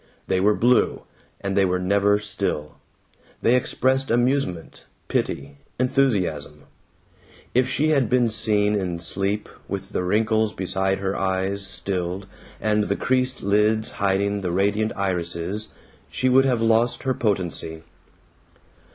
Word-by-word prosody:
They 95 Hz, -, +1 dB
were 105 Hz, +2 st, +3 dB
blue, 125 Hz, +1 st, +2 dB, 0.4 s
and 100 Hz, 0 st, -2 dB
they 100 Hz, -, +4 dB
were 90 Hz, -1 st, +1 dB
never 100 Hz, +2 st, +2 dB
still; 100 Hz, -8 st, -3 dB, 0.7 s
they 120 Hz, -, +4 dB
expressed 130 Hz, +1 st, +1 dB
amusement, 120 Hz, -8 st, 0 dB, 0.2 s
pity, 70 Hz, +1 st, -2 dB, 0.2 s
enthusiasm. 100 Hz, -, 0 dB, 0.9 s
If 125 Hz, +1 st, +2 dB
she 150 Hz, +3 st, +1 dB
had 135 Hz, -7 st, +2 dB
been 125 Hz, 0 st, +3 dB
seen 105 Hz, -1 st, +1 dB
in 95 Hz, -4 st, -1 dB
sleep, 95 Hz, +5 st, -2 dB, 0.2 s
with -, -, -5 dB
the -, -, -1 dB
wrinkles 110 Hz, +3 st, +1 dB
beside 95 Hz, +1 st, 0 dB
her 95 Hz, 0 st, -2 dB
eyes 95 Hz, +1 st, -1 dB
stilled 95 Hz, 0 st, -2 dB, 0.3 s
and 105 Hz, -1 st, +1 dB
the 100 Hz, -, 0 dB
creased 130 Hz, +2 st, 0 dB
lids 105 Hz, +2 st, +2 dB
hiding 100 Hz, +1 st, +1 dB
the 90 Hz, -2 st, -2 dB
radiant 100 Hz, +4 st, +1 dB
irises, 90 Hz, +1 st, -2 dB, 0.4 s
she 130 Hz, -, 0 dB
would 135 Hz, +1 st, +5 dB
have 125 Hz, -4 st, +1 dB
lost 115 Hz, +1 st, +2 dB
her 130 Hz, -, +1 dB
potency. 90 Hz, -7 st, -2 dB
100 Hz, 130 wpm, -23 LUFS, 95-115 Hz, 0.9 s, would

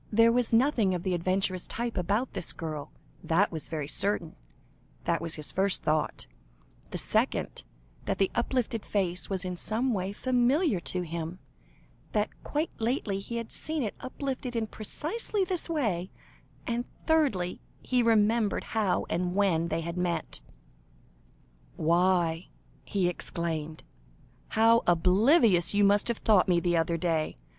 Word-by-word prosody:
There 230 Hz, +2 st, +5 dB
was 245 Hz, 0 st, +1 dB
nothing 230 Hz, -5 st, +3 dB
of 175 Hz, -, -4 dB
the 185 Hz, -, 0 dB
adventuress 185 Hz, +1 st, 0 dB
type 235 Hz, 0 st, -3 dB
about 205 Hz, +8 st, 0 dB
this 185 Hz, -3 st, -3 dB
girl, 155 Hz, -3 st, -5 dB, 0.3 s
that 185 Hz, +5 st, +2 dB
was 160 Hz, -3 st, -5 dB
very 155 Hz, -3 st, -3 dB
certain, 185 Hz, 0 st, +1 dB, 0.8 s
was 165 Hz, -1 st, -4 dB
his 150 Hz, -2 st, -6 dB
first 195 Hz, 0 st, 0 dB
thought; 155 Hz, 0 st, 0 dB, 0.7 s
his -, -, -2 dB
second, -, -, -1 dB, 0.4 s
that -, -, -1 dB
the 195 Hz, -, +2 dB
uplifted 235 Hz, -3 st, -1 dB
face 185 Hz, -3 st, -1 dB
was 190 Hz, -1 st, -2 dB
in 180 Hz, -1 st, -3 dB
some 230 Hz, +7 st, +1 dB
way 190 Hz, -1 st, -2 dB
familiar 255 Hz, -, +2 dB
to 170 Hz, +4 st, -3 dB
him, 165 Hz, +1 st, -5 dB, 0.8 s
that 210 Hz, 0 st, +1 dB
quite 300 Hz, +3 st, -2 dB
lately 225 Hz, -4 st, -1 dB
he 215 Hz, +4 st, -6 dB
had 230 Hz, -1 st, -4 dB
seen 310 Hz, -3 st, -1 dB
it 210 Hz, -, -2 dB
uplifted 260 Hz, -1 st, -4 dB
in 225 Hz, -1 st, 0 dB
precisely 360 Hz, -, -2 dB
this 365 Hz, -2 st, -2 dB
way; 210 Hz, -, -1 dB, 0.6 s
and 240 Hz, +1 st, -1 dB, 0.2 s
thirdly, 270 Hz, -, +1 dB, 0.2 s
he 250 Hz, -1 st, +2 dB
remembered 225 Hz, -1 st, +2 dB
how 215 Hz, -4 st, 0 dB
and 180 Hz, +1 st, -1 dB
when 180 Hz, -5 st, +2 dB
they 165 Hz, 0 st, -1 dB
had 170 Hz, +2 st, -5 dB
met. 180 Hz, -1 st, -2 dB, 1.3 s
"Why," 170 Hz, +1 st, +2 dB, 0.4 s
he 190 Hz, -3 st, 0 dB
exclaimed, 160 Hz, -3 st, -4 dB, 0.6 s
"how 230 Hz, +1 st, +4 dB
oblivious 185 Hz, -, +4 dB
you 205 Hz, -, +4 dB
must 205 Hz, +1 st, +4 dB
have 235 Hz, -2 st, +1 dB
thought 210 Hz, -4 st, +4 dB
me 175 Hz, -1 st, +4 dB
the 175 Hz, 0 st, +1 dB
other 165 Hz, 0 st, +1 dB
day! 165 Hz, -2 st, -1 dB
195 Hz, 145 wpm, -29 LUFS, 175-235 Hz, 1.3 s, There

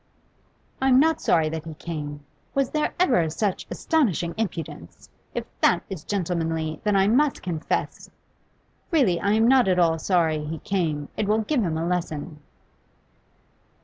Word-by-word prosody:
'I'm 265 Hz, -1 st, +5 dB
not 320 Hz, +3 st, +3 dB
sorry 160 Hz, -2 st, +3 dB
that 160 Hz, 0 st, -4 dB
he 160 Hz, -1 st, -7 dB
came. 145 Hz, -3 st, -6 dB, 0.3 s
Was 275 Hz, -2 st, +1 dB
there 305 Hz, -1 st, 0 dB
ever 240 Hz, -, +3 dB
such 190 Hz, +5 st, -2 dB
astonishing 195 Hz, -, 0 dB
impudence? 165 Hz, -, -6 dB, 0.2 s
If -, -, -2 dB, 0.2 s
that -, -, +4 dB
is 175 Hz, -5 st, -6 dB
gentlemanly, 165 Hz, -5 st, -2 dB
then 210 Hz, -1 st, +2 dB
I 195 Hz, 0 st, +4 dB
must 275 Hz, +6 st, +2 dB
confess 165 Hz, -3 st, -3 dB
I -, -, -35 dB, 0.8 s
Really 240 Hz, -, +3 dB
I 200 Hz, +1 st, +1 dB
am 225 Hz, +1 st, +4 dB
not 255 Hz, -3 st, +5 dB
at 185 Hz, -1 st, +2 dB
all 165 Hz, -2 st, +3 dB
sorry 160 Hz, -4 st, +1 dB
he 155 Hz, +2 st, -4 dB
came: 155 Hz, -6 st, -2 dB
it 210 Hz, -, 0 dB
will 215 Hz, +1 st, +2 dB
give 275 Hz, +2 st, 0 dB
him 165 Hz, -6 st, -1 dB
a 165 Hz, -, -2 dB
lesson. 165 Hz, -3 st, -3 dB
175 Hz, 155 wpm, -24 LUFS, 160-220 Hz, 0.8 s, I'm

